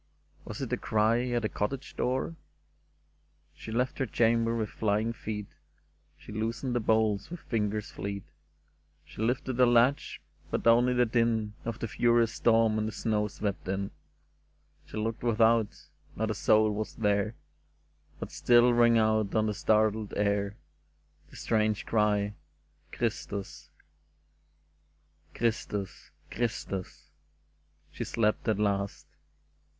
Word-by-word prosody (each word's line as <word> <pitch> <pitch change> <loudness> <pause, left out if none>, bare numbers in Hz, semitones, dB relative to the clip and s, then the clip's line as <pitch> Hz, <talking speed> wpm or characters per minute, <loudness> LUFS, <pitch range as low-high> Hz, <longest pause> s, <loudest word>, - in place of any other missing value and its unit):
Was - - -5
it - - -4
a - - +1
cry 110 +3 +1
at 120 -1 -1
the - - +2
cottage 135 +7 -4
door? 130 +6 -1 1.2
She 110 - -9
left 125 +3 -1
her 135 - 0
chamber 115 +1 +2
with 110 -2 -2
flying 110 +2 0
feet; 105 -2 -5 0.7
She - - -12
loosened 115 +4 -2
the 120 - +1
bolts 110 -2 +1
with 175 -1 -7
fingers 105 -2 -2
fleet; 100 0 -5 0.8
She - - -9
lifted 125 +2 -1
the 125 -1 +6
latch, 120 +5 +3 0.3
but - - -2
only 120 +2 +5
the 125 0 +4
din 115 -2 +1
Of 115 -1 -3
the 115 - -4
furious 115 +1 +2
storm 115 -1 +3
and 110 - -1
the - - -3
snow 105 -1 0
swept 100 -2 -4
in. 95 +1 -2 1.0
She - - -8
looked 110 +1 -2
without: 115 -1 +3 0.5
not 110 0 -1
a - - 0
soul 110 +1 +3
was 105 0 -4
there, 105 0 +1 0.8
But - - -6
still 120 0 +4
rang 120 -1 +5
out 110 -2 +2
on 110 0 +3
the 105 - 0
startled 110 0 +1
air 100 0 0 0.7
The - - -16
strange 110 -2 0
cry, 105 -2 +1 0.6
'^ - - -34
Christus!" 80 -8 -4 0.8
'* 75 0 -39
Christus! 105 -4 -2 0.2
Christus! 110 -5 -4 0.4
" 75 0 -39
She - - -5
slept 110 0 0
at 110 -3 +2
last. 100 -1 -1
110 Hz, 135 wpm, -29 LUFS, 105-115 Hz, 1.2 s, the